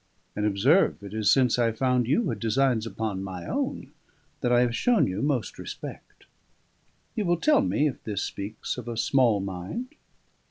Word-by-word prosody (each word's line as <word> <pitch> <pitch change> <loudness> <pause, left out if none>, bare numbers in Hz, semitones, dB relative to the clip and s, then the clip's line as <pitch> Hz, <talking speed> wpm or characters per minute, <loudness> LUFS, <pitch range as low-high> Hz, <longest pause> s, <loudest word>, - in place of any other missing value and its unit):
And, 105 0 0
observe, 115 - +3
it 100 0 -8
is 110 -1 +1
since 125 -3 +4
I 115 -1 +3
found 125 +1 +1
you 220 - +2
had 115 -4 -3
designs 115 +1 +1
upon 105 -2 -3
my 95 -3 -6
own - - -3 0.5
that 120 - 0
I 120 0 +5
have 120 -1 +1
shown 245 - +3
you 95 +3 -3
most 140 -5 -1
respect. - - -9 0.9
You 215 - 0
will 175 0 +2
tell 295 - +4
me 150 - +1
if 140 - -5
this 105 -2 -3
speaks 105 +5 -5
of 120 - -9
a 120 -1 -4
small 120 -3 +3
mind." 95 - -5
115 Hz, 175 wpm, -26 LUFS, 105-135 Hz, 0.9 s, I